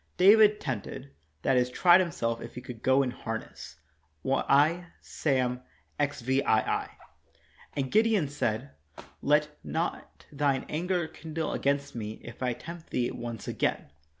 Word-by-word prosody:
David 210 +2 +7
tempted; 110 - -5 0.3
that 130 - +3
is, 125 0 +2
tried 175 +7 +6
himself 115 -10 -2
if 120 - -9
he 125 - -6
could 120 -2 -9
go 130 +2 +4
in 125 - -2
harness 115 -2 -7 0.5
(I. 150 +6 +3
Sam., 125 -4 -1 0.4
xvii). 135 -1 0
And 130 +4 -3
Gideon 215 -7 +3
said: 135 -2 -2 0.5
"Let 150 +1 +3
not 165 +2 -4
thine 140 -2 0
anger 175 +1 -1
kindle 160 -1 -4
against 140 0 0
me, 110 -2 -4
if 120 +1 -11
I 125 -1 +1
tempt 165 +7 -10
thee 120 -1 0
once 115 -2 -6
again. - - -1
140 Hz, 130 wpm, -29 LUFS, 125-160 Hz, 0.5 s, David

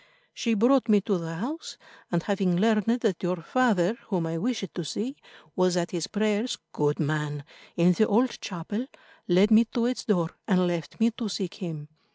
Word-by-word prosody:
She 230 -2 0
brought 240 +2 +3
me 210 -1 +6
to 195 -2 0
the 165 0 -5
house, 265 - -5 0.3
and 170 -1 +1
having 195 -3 +1
learned 225 +3 +2
that 200 -7 0
your 180 0 0
father, 225 -3 +2
whom 180 -5 -1
I 165 0 -2
wished 220 -3 -2
to 175 - -4
see, 220 - -4 0.4
was 185 -1 +2
at 175 -1 -1
his 170 -3 -2
prayers, 215 +3 0
good 145 0 0
man, 150 -1 -1 0.3
in 175 +1 +5
the 215 +4 +3
old 240 +4 +1
chapel, 205 +7 -4 0.4
led 190 +4 +4
me 220 +2 +7
to 235 -1 +2
its 250 +1 -2
door 175 -6 +1 0.2
and 185 -4 +3
left 170 +1 -3
me 230 +1 +4
to 230 -1 -4
seek 190 -2 -3
him. 160 -6 -6
195 Hz, 190 wpm, -27 LUFS, 170-225 Hz, 0.4 s, me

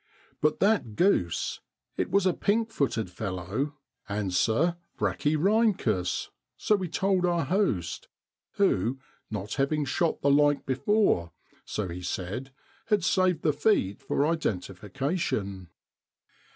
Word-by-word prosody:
But 150 0 +2
that 200 - +2
goose 105 - +1 0.4
it - - -1
was 200 -1 +2
a 185 - +3
pink 225 +5 0
footed 125 - 0
fellow 100 - -3 0.3
(Anser 110 - +1 0.2
brachyrhyncus), 155 - +1 0.3
so 215 - +2
we 185 -4 -3
told 190 +1 +1
our 175 -3 +1
host, 130 - 0 0.5
who, 130 - +1 0.3
not 105 0 -4
having 150 +1 +1
shot 165 +5 0
the 140 - +4
like 145 0 +3
before, 135 - +1 0.3
so 105 -3 -3
he 90 +1 -6
said, 95 +9 -4 0.4
had 210 -5 +2
saved 185 -2 +2
the 150 - +3
feet 140 - +1
for 140 - 0
identification. 105 - -2
145 Hz, 115 wpm, -28 LUFS, -, 0.5 s, the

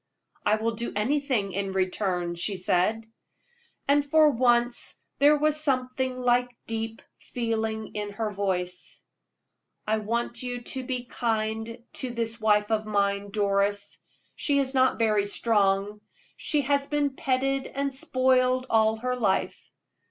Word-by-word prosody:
"I 210 - +3
will 225 +1 -1
do 235 +1 -4
anything 245 -2 0
in 195 0 -3
return," 185 -2 -1
she 180 +3 -2
said. 185 +5 +1 0.8
And 285 +1 +4
for 305 +1 +5
once 240 -1 +2 0.2
there 295 +2 +6
was 305 +1 +2
something 255 -2 0
like 245 0 +2 0.2
deep 225 0 -4 0.2
feeling 220 -2 -3
in 205 -1 -4
her 215 0 -2
voice. 180 -3 -3 0.8
"I 220 +1 +1
want 235 +2 -2
you 245 -1 -4
to 260 +2 -4
be 250 -1 -3
kind 225 0 -2 0.2
to 255 - -2
this 230 -1 -3
wife 210 0 +3
of 215 -1 0
mine, 200 -1 0
Doris. 200 0 0 0.4
She 285 -2 +1
is 270 -1 +1
not 260 -1 +3
very 215 -3 +2
strong: 205 -1 +1 0.3
she 295 - 0
has 280 0 +1
been 290 -1 0
petted 270 +1 0
and 275 0 -3
spoiled 255 -3 +2
all 220 0 +4
her 250 +3 -2
life. 205 -6 -1
230 Hz, 135 wpm, -26 LUFS, 205-255 Hz, 0.8 s, there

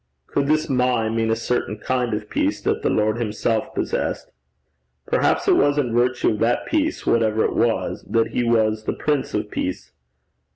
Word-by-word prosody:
Could 140 -1 -1
this 155 +1 +2
my 125 -4 +1
mean 115 0 0
a 110 - +2
certain 115 -2 -2
kind 125 0 -1
of 105 0 -5
peace - - 0
that - - 0
the - - +1
Lord 110 +2 +1
himself 110 0 -1
possessed? - - -2 0.7
Perhaps - - +1
it - - +5
was 145 0 +3
in 125 -6 0
virtue 120 +1 +2
of 105 - -3
that 115 +1 +1
peace, 315 0 -1
whatever 110 -1 +2
it - - -1
was, 115 -1 0
that 115 -1 +2
he 125 - -1
was 110 -2 +1
the - - -1
Prince 145 -3 -1
of 105 0 -3
Peace. 80 -8 -4
115 Hz, 180 wpm, -22 LUFS, 110-125 Hz, 0.7 s, it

